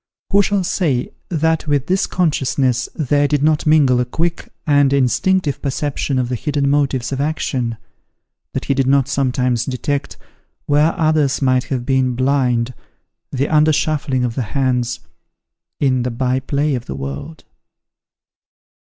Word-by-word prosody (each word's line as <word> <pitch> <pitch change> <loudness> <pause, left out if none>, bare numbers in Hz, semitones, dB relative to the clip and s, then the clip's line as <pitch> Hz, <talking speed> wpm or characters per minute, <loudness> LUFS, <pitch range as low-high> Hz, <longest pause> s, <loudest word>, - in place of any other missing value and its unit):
Who 200 0 +5
shall 200 -1 0
say 155 -9 -1 0.2
that 160 -1 0
with 145 -2 +1
this 185 +4 +1
consciousness 135 -7 0
there 145 -1 +1
did 145 -1 0
not 155 0 +2
mingle 145 -5 +4
a 125 - +1
quick 170 +7 -3 0.2
and 145 -2 +3
instinctive 140 +4 +1
perception 140 0 -2
of 125 -1 0
the 125 - -4
hidden 140 +2 0
motives 140 -4 0
of 135 0 -2
action, 130 -6 -2 0.8
that - - -3
he - - +1
did 135 -1 0
not 135 -1 +3
sometimes 125 -3 0
detect, 140 +2 -3 0.5
where 150 +3 +2
others 155 -4 +2
might 130 -2 +2
have 125 -3 -3
been 130 -2 +1
blind, 125 -2 +1 0.6
the 135 +1 0
under 155 0 +4
shuffling 145 -4 0
of 120 - -3
the 130 - -2 0.2
hands, 125 -2 0 0.8
in 130 -3 +2
the 125 - -1
by 125 +2 0
play 140 +2 -1
of 125 -2 -4
the - - -5
world? 70 - -7
140 Hz, 150 wpm, -18 LUFS, 125-150 Hz, 0.8 s, Who